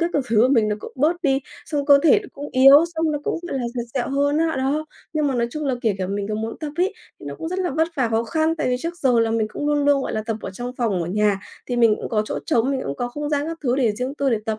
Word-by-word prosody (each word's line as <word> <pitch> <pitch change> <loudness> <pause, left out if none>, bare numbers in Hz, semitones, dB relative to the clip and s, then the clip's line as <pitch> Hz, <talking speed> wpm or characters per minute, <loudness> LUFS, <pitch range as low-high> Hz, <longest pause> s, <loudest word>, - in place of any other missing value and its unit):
các 340 +1 +1
cứ 290 - +2
thứ 225 - 0
của 240 +4 +5
mình 230 -6 +3
nó 210 - -1
cũng - - -9
bớt 325 +6 +1
đi, 270 -4 +2 0.3
xong 290 -2 -2
cơ 285 -1 +7
thể 335 +6 +6
nó 400 - -11
cũng 290 +1 -7
yếu, 275 +4 +8
xong 320 -1 0
nó 295 - -1
cũng, - - -1
gọi 270 - -2
là, 250 - -3
dặt 240 - -2
dẹo 250 -3 -1
hơn 285 +2 +1
á, 320 -2 +1
đó. 285 +4 -1 0.3
Nhưng 305 -2 +1
mà 275 - 0
nói 235 -1 +1
chung 305 +4 -4
là 270 -3 +1
kể 220 -4 +2
cả 185 - -2
mình 200 +1 -3
có 215 - -2
muốn 220 +1 -4
tập 300 -2 -4
ấy, 365 +3 +1 0.2
nó 145 0 -7
cũng 320 - -6
rất 365 - -3
là 365 -2 -1
vất 320 +4 +1
vả, 255 -4 +1
khó 225 +1 0
khăn, 315 +4 0
tại 305 - -1
vì 250 - +1
trước 335 +1 -4
giờ 250 -4 +3
là 225 -1 +1
mình 225 -1 +1
cũng 290 - -4
luôn 290 -1 +1
luôn, 285 -1 +3
gọi - - -3
là, 215 - -2
tập 225 -2 -1
ở - - -6
trong 245 +6 -6
phòng 210 -8 0
ở 165 - -4
nhà, 205 +1 +1 0.3
thì 245 - -2
mình 230 -3 +4
cũng - - -6
có 215 -3 +1
chỗ - - -3
trống, 235 +3 +2
mình 270 -2 -1
cũng 140 - -4
có 245 - -2
không 295 +4 -5
gian 290 0 0
các 330 0 -5
thứ 250 -1 +1
để 240 -6 +2
riêng 250 +5 -4
tư 280 -2 0
để 225 - +2
tập. 220 -1 -2
265 Hz, 330 wpm, -22 LUFS, 225-295 Hz, 0.3 s, yếu